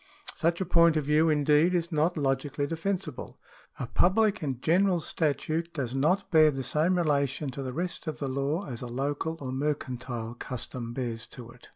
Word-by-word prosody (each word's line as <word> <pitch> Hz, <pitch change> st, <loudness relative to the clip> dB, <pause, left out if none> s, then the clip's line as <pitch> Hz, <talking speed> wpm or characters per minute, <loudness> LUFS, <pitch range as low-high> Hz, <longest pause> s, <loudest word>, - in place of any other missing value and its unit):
Such 170 Hz, +1 st, 0 dB
a 190 Hz, -, -1 dB
point 170 Hz, -2 st, +5 dB
of 150 Hz, -, 0 dB
view, 155 Hz, +2 st, +4 dB
indeed, 150 Hz, +3 st, +3 dB
is 170 Hz, 0 st, -1 dB
not 160 Hz, +3 st, +1 dB
logically 140 Hz, 0 st, 0 dB
defensible. 165 Hz, -2 st, -4 dB, 0.4 s
A 125 Hz, -, -2 dB
public 205 Hz, -, +2 dB
and 135 Hz, -5 st, -3 dB
general 180 Hz, +5 st, +3 dB
statute 160 Hz, +1 st, -1 dB
does 130 Hz, -5 st, -2 dB
not 165 Hz, +10 st, +1 dB
bear 155 Hz, -2 st, +7 dB
the 135 Hz, -2 st, -3 dB
same 160 Hz, +8 st, +1 dB
relation 140 Hz, -3 st, 0 dB
to 140 Hz, -, -6 dB
the 130 Hz, -1 st, -4 dB
rest 175 Hz, +4 st, -4 dB
of 155 Hz, -, -3 dB
the 140 Hz, -, -3 dB
law 140 Hz, +7 st, -1 dB
as 120 Hz, -4 st, -6 dB
a 125 Hz, -, -5 dB
local 145 Hz, +6 st, -2 dB
or 130 Hz, -2 st, -5 dB
mercantile 130 Hz, -4 st, -3 dB
custom 120 Hz, -1 st, -6 dB
bears 115 Hz, -3 st, -4 dB
to 120 Hz, -2 st, -10 dB
it. 125 Hz, -, -17 dB
150 Hz, 185 wpm, -28 LUFS, 130-165 Hz, 0.4 s, bear